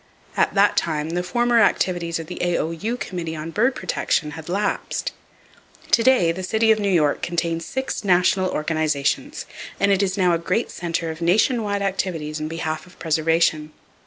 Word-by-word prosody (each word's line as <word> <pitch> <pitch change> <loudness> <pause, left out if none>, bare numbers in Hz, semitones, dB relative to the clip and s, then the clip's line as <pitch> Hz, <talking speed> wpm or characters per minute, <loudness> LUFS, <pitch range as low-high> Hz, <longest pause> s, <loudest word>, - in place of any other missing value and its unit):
At - - +1
that 200 0 +4
time 155 -1 0
the 175 +1 0
former 240 +6 +2
activities 175 -5 +1
of 165 - -6
the - - -8
A.O.U. 175 +6 -1
Committee 170 -7 -5
on 155 +1 -6
Bird 245 +8 +2
Protection 165 -5 -1
had 160 +2 -9
lapsed. 200 +4 -1 0.8
To - - +5
day 230 -9 +4
the 180 +3 -5
city 220 +4 +2
of 220 - +3
New 200 -1 0
York 155 -6 +2
contains 165 -1 -2
six 265 -3 -3
national 185 0 +3
organizations, 155 -3 -1 0.3
and 200 - +3
it 195 0 +3
is 190 -1 0
now 180 -2 +3
a 165 - +1
great 185 +7 -1
center 165 -2 -3
of 160 +1 -9
nation 220 +8 +3
wide 200 -1 -1
activities 165 -6 -2
in 155 - -3
behalf 160 +1 -4
of 180 - -18
preservation. 160 -1 +1
175 Hz, 175 wpm, -22 LUFS, 160-200 Hz, 0.8 s, To